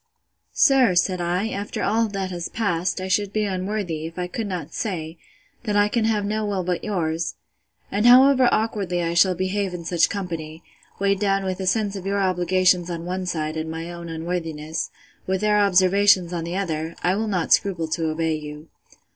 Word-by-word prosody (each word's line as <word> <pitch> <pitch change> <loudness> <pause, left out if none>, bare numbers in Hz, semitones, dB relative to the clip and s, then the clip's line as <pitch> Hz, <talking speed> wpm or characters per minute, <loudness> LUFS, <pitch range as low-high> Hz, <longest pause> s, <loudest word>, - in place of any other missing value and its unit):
Sir, 265 -9 +5
said 185 0 +1
I, 180 +5 -1
after 200 -1 -4
all 225 +2 +2
that 195 -2 -4
has 175 -1 -4
passed, 185 -5 -1
I 185 - -4
should 195 +1 +1
be 215 +1 0
unworthy, 185 -4 -3
if 165 - -12
I 180 - -2
could 210 +5 -4
not 170 -5 -5
say, 165 -6 -4 0.5
that 210 -2 -1
I 205 0 +4
can 225 0 0
have 215 -2 +1
no 215 +1 -1
will 200 -3 -1
but 180 -1 -2
yours: 165 -5 -2 0.6
And 210 +4 +2
however 255 0 +7
awkwardly 200 -5 0
I 170 0 -1
shall 185 +2 +4
behave 190 +1 -2
in 170 -1 -8
such 170 -1 +2
company, 165 -5 -5 0.3
weighed 200 0 +1
down 195 -1 +1
with 185 -1 -3
a 190 - -3
sense 205 +1 +1
of 195 -1 -6
your 200 +1 0
obligations 185 -1 +2
on 170 -1 -5
one 185 +1 -3
side, 155 -2 -2
and 160 0 -3
my 165 +2 -5
own 170 -1 -8
unworthiness, 160 -2 -4 0.4
with 190 0 0
their 210 -1 +3
observations 190 -1 +4
on 165 -1 -3
the 175 +2 -3
other, 165 -4 -3
I 180 - +3
will 220 +3 -1
not 180 -5 +1
scruple 180 -5 +1
to 160 0 -1
obey 160 0 -1
you. 150 0 -7
185 Hz, 195 wpm, -23 LUFS, 170-205 Hz, 0.6 s, however